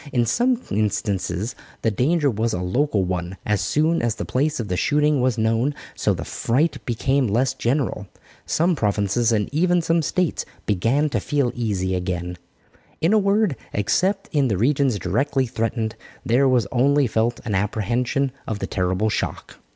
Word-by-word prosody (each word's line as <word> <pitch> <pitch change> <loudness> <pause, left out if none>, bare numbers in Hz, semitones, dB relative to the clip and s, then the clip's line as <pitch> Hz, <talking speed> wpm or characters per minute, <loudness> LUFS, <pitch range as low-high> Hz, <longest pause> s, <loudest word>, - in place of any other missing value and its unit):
In 120 -3 +2
some 245 - +2
instances 105 -1 -1 0.3
the 115 - +2
danger 145 - +2
was 115 +1 -1
a 90 - -1
local 105 +2 +1
one 90 +1 -3
as 105 -1 +1
soon 160 +3 +1
as 120 -2 0
the - - -4
place 150 +3 0
of 115 - -3
the 90 - -1
shooting 150 +5 +2
was 125 -2 +1
known, 115 +6 +1 0.2
so - - 0
the - - -6
fright 145 +8 0
became 130 +3 +1
less 125 +5 +1
general. 120 -5 -1 0.4
Some 170 +2 +2
provinces 105 0 +1
and 105 -2 +1
even 175 +3 +3
some 165 +1 +2
States 170 +4 0 0.2
began 115 +10 +1
to - - +1
feel 140 -5 0
easy 100 -6 -1
again. 90 -1 -3 0.6
In 165 +6 +2
a 215 - +5
word, 200 -4 +2 0.2
except 185 - +1
in 145 -3 +3
the 105 -5 0
regions 130 +1 +2
directly 130 +9 0
threatened, 115 -1 -2 0.3
there 130 +4 +3
was 125 -4 +3
only 140 +3 +3
felt 115 0 0
an 105 - -2
apprehension 120 +7 0 0.2
of 110 - -2
the - - -3
terrible 95 +3 0
shock. - - -4
120 Hz, 165 wpm, -22 LUFS, 105-145 Hz, 0.6 s, a